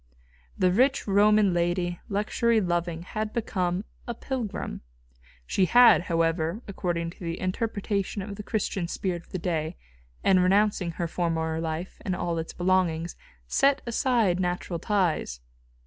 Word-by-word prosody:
The 185 -1 +3
rich 260 +8 +2
Roman 205 0 +4
lady, 175 0 0
luxury 220 +3 +1
loving, 175 -3 -1
had 215 +3 -4
become 185 -4 -1 0.2
a 240 - -3
pilgrim. 230 - -4 0.6
She 185 - +2
had, 240 +2 +7
however, 165 +4 0
according 170 -4 -2
to - - -18
the 170 -2 -4
interpretation 200 0 -2
of 200 +1 -6
the 210 - -6
Christian 200 -4 -2
spirit 175 -1 -3
of - - -24
that 180 -2 -5
day, 160 -1 -2 0.5
in 190 -1 +5
renouncing 190 -1 +2
her 170 +1 -2
former 160 -1 -1
life 165 +2 -4
and 185 - -2
all 170 -1 -2
its 160 - -5
belongings, 175 -2 0 0.3
set 275 - +3
aside 230 -6 +2
natural 180 -1 -2
ties. 175 - 0
185 Hz, 140 wpm, -27 LUFS, 170-210 Hz, 0.6 s, had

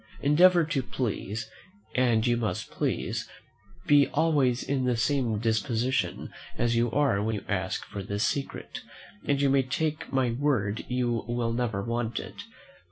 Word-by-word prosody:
Endeavour 170 +5 +6
to 145 -3 -1
please, 110 -3 -3 0.5
and 120 -3 +2
you 120 -1 +3
must 110 -6 -3
please; - - -2 0.6
be 145 -1 +5
always 145 -6 +2
in 135 -2 -1
the 125 -2 +1
same 120 -3 +1
disposition 115 +4 -1 0.2
as 120 0 +1
you 120 +1 +2
are 135 -6 +2
when 110 +1 -1
you 105 - -6
ask - - -2
for 100 - -6
this 100 +2 -2
secret, 140 -1 -3 0.5
and 140 -1 +2
you 140 - +3
may 135 0 +4
take 150 +4 -2
my 130 -3 +1
word 115 -6 0
you 120 -2 0
will 120 -1 -1
never 115 -5 -1
want 115 0 -2
it. - - -9
120 Hz, 155 wpm, -28 LUFS, 115-140 Hz, 0.6 s, Endeavour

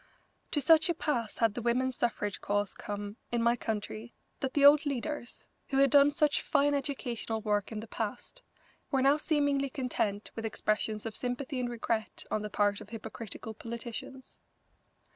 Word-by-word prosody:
To 295 - +1
such 320 +5 +6
a 345 - +1
pass 240 -9 -1
had 225 -3 +3
the 240 - -4
women's 250 +2 +1
suffrage 210 -4 -1
cause 205 0 0
come 205 +1 -6
in 235 -1 +1
my 235 +1 +4
country 220 0 -4 0.2
that 265 -1 -3
the 285 -1 +5
old 295 +1 +8
leaders, 285 -2 -4 0.2
who 270 - -1
had 275 -2 +5
done 285 0 +7
such 295 0 +2
fine 290 0 +2
educational 245 -6 -2
work 205 -1 0
in 215 -1 -4
the 225 - -9
past, 230 - -5 0.5
were 270 -1 +2
now 280 +2 +5
seemingly 285 -3 +1
content 230 -6 -2
with 225 - -4
expressions 215 0 -1
of 220 -2 -4
sympathy 255 +2 -2
and 245 -1 -1
regret 230 -2 -2
on 215 - 0
the 210 - -4
part 205 0 +1
of 210 - -11
hypocritical 220 0 -7
politicians. 235 +3 -7
235 Hz, 170 wpm, -31 LUFS, 215-275 Hz, 0.5 s, old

